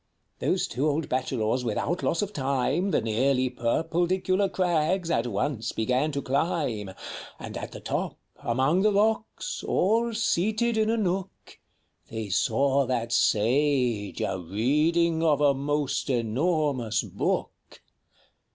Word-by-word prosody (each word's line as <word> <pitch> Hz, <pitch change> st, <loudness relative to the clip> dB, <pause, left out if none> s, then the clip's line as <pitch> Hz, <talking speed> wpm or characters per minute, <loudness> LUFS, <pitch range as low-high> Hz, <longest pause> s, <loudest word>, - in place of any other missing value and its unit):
Those -, -, +1 dB
two 140 Hz, +5 st, 0 dB
old 150 Hz, 0 st, -1 dB
Bachelors 125 Hz, -2 st, 0 dB
without 125 Hz, +9 st, -1 dB
loss 170 Hz, -, 0 dB
of 205 Hz, 0 st, -5 dB
time 140 Hz, +5 st, 0 dB
The -, -, +2 dB
nearly 130 Hz, +3 st, +1 dB
purpledicular 175 Hz, +9 st, 0 dB
crags 175 Hz, -1 st, +1 dB
at 115 Hz, -5 st, +1 dB
once 115 Hz, +2 st, -2 dB
began 125 Hz, +7 st, 0 dB
to 140 Hz, -1 st, -2 dB
climb; 135 Hz, -, -1 dB, 0.5 s
And -, -, -8 dB
at -, -, -5 dB
the -, -, -9 dB
top, -, -, -3 dB, 0.2 s
among 130 Hz, +9 st, +1 dB
the 210 Hz, +1 st, +4 dB
rocks, 220 Hz, -, 0 dB
all 225 Hz, +4 st, +1 dB
seated 220 Hz, +3 st, +1 dB
in 220 Hz, 0 st, +2 dB
a 230 Hz, -, +1 dB
nook, 195 Hz, -2 st, -3 dB, 0.5 s
They 110 Hz, -2 st, -5 dB
saw 135 Hz, +7 st, +2 dB
that 120 Hz, -2 st, -1 dB
Sage 120 Hz, -2 st, +2 dB
a 95 Hz, -, -1 dB
reading 150 Hz, -, +1 dB
of 155 Hz, -3 st, +3 dB
a 145 Hz, -1 st, +4 dB
most 145 Hz, +1 st, -1 dB
enormous 130 Hz, -1 st, 0 dB
book. -, -, -3 dB
145 Hz, 130 wpm, -27 LUFS, 125-175 Hz, 0.5 s, the